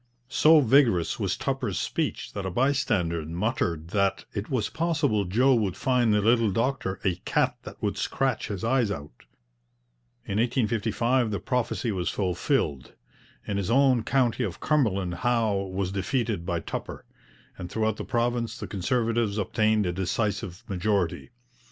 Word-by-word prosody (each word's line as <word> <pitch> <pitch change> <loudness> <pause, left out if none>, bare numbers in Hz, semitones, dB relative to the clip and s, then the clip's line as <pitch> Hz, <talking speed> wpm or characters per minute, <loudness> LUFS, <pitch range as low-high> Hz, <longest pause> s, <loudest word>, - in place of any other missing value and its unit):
So 155 +3 +6
vigorous 120 - +3
was - - -1
Tupper's - - -2
speech - - -2
that 100 - -4
a 95 - -2
bystander 100 - +1
muttered 85 -2 -2
that 100 0 0
'it 100 +1 -4
was 125 -6 0
possible 150 -11 0
Joe 125 +9 +3
would 105 -6 0
find 125 -4 +2
the 105 0 +3
little 115 +1 +3
doctor 115 -2 -1
a 95 -3 +1
cat - - 0
that - - -9
would - - -1
scratch - - -1
his 100 -3 -5
eyes 120 -1 +2
out.' 70 -9 -7 1.0
In 100 +1 -1
1855 115 +1 +1
the 100 -3 -2
prophecy 120 +1 -1
was 90 -3 -1
fulfilled. 85 -7 -1 0.5
In 100 - -2
his 100 0 -2
own 130 -1 +4
county 125 0 +1
of 95 -7 -4
Cumberland 100 - +1
Howe 110 -5 +1
was 95 0 -2
defeated 100 -2 -1
by 85 -3 -1
Tupper, - - -6 0.5
and 90 - -7
throughout 110 +1 0
the - - -4
province 120 0 -1
the - - -5
Conservatives 115 +1 0
obtained 110 +1 +1
a 90 - 0
decisive 95 -1 -2
majority. 95 -1 -1
110 Hz, 150 wpm, -26 LUFS, 95-120 Hz, 1.0 s, So